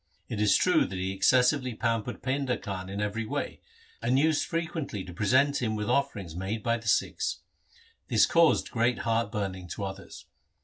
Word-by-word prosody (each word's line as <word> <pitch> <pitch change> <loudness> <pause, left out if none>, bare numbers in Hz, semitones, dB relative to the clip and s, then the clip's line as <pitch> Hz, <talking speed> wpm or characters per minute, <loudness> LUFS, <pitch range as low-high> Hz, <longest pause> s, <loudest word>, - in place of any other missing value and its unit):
It 105 - -3
is 105 -2 +5
true 180 -3 +3
that 95 - -6
he 95 +1 -2
excessively 125 +5 +3
pampered 115 0 -2
Painda 130 -1 -1
Khan 95 -2 -5
in 100 +1 -5
every 105 +2 -2
way, 110 - -4 0.4
and 120 +3 +2
used 155 +2 +2
fre 165 -1 0
quently 160 - -5
to 90 - -9
present 130 +9 +2
him 110 -3 0
with 105 -1 -2
offerings 105 - -1
made 100 +4 -3
by 115 0 +1
the 110 -1 -10
Sikhs. - - 0 0.7
This - - +4
caused 165 -1 +3
great 120 +1 +1
heart 115 -2 +1
burning 95 -4 -4
to 100 - -5
others. 95 0 -7
115 Hz, 180 wpm, -28 LUFS, 100-130 Hz, 0.7 s, is